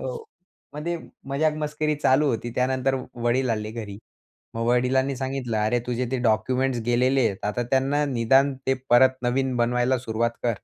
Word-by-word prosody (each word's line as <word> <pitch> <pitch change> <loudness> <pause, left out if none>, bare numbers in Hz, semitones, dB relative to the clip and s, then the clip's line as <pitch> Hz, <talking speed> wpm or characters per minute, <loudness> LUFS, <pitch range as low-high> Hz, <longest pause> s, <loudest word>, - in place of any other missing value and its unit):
हो, - - -4 0.6
म्हणजे 165 +4 -3 0.3
मजाक 150 +3 +1
मस्करी 150 0 -1
चालू 145 0 +3
होती. 120 0 -2
त्यानंतर 130 +1 +1 0.3
वडील 125 +1 +1
आले 105 -1 -2
घरी. 105 -3 -7 0.6
मग 115 0 -2
वडिलांनी 130 +2 +2
सांगितलं, 130 -3 -3
अरे 110 +3 +1
तुझे 125 +1 -1
ते 130 - 0
डॉक्युमेंट्स 125 +3 +1
गेलेले 125 +3 +2
आहेत, 100 0 -5
आता 105 +4 -1
त्यांना 135 +3 +2
निदान 135 +2 +3
ते 135 - +4 0.2
परत 130 +2 +5
नवीन 130 +1 0
बनवायला 125 +2 +1
सुरुवात 115 0 -1
कर. 120 - +2
130 Hz, 160 wpm, -24 LUFS, 120-135 Hz, 0.6 s, परत